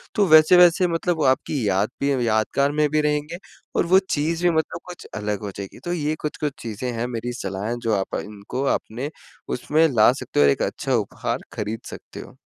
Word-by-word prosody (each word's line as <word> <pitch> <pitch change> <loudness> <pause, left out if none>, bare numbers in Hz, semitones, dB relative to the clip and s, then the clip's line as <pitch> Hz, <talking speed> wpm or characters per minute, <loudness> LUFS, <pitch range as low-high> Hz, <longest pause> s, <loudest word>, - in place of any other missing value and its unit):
तो 205 - +4
वैसे-वैसे 175 +3 +7
मतलब 170 +1 -1
वो 155 - 0
आपकी 130 -2 +1
याद 100 +3 +1
भी 140 0 +2 0.2
यादगार 110 +6 +1
में 150 0 +2
भी 155 0 +2
रहेंगे 150 +3 -1 0.4
और - - +2
वो 190 +2 +6 0.2
चीज़ 165 +3 -1
भी 175 - +5
मतलब 160 - -1
कुछ 180 - -10
अलग 105 -1 -3
हो 100 - -4
जाएगी। 100 -1 -8
तो 175 - -1
ये 155 -2 -1
कुछ-कुछ 150 -1 -3
चीज़ें 115 +2 -4
हैं 120 - -1
मेरी 120 0 -4
सलाह 95 +1 -4
हैं, 120 +1 -3
जो 115 -2 -1
आप 95 -1 -2
इनको 105 +6 -5
आपने 125 +7 -5 0.5
उसमें 155 +6 +2
ला 110 +2 +6
सकते - - -2
हो - - +6
और 70 - +6
एक - - -1
अच्छा - - -1
उपहार - - -2
खरीद 105 +2 -4
सकते - - -10
हो। - - -14
140 Hz, 205 wpm, -23 LUFS, 110-155 Hz, 0.5 s, वैसे-वैसे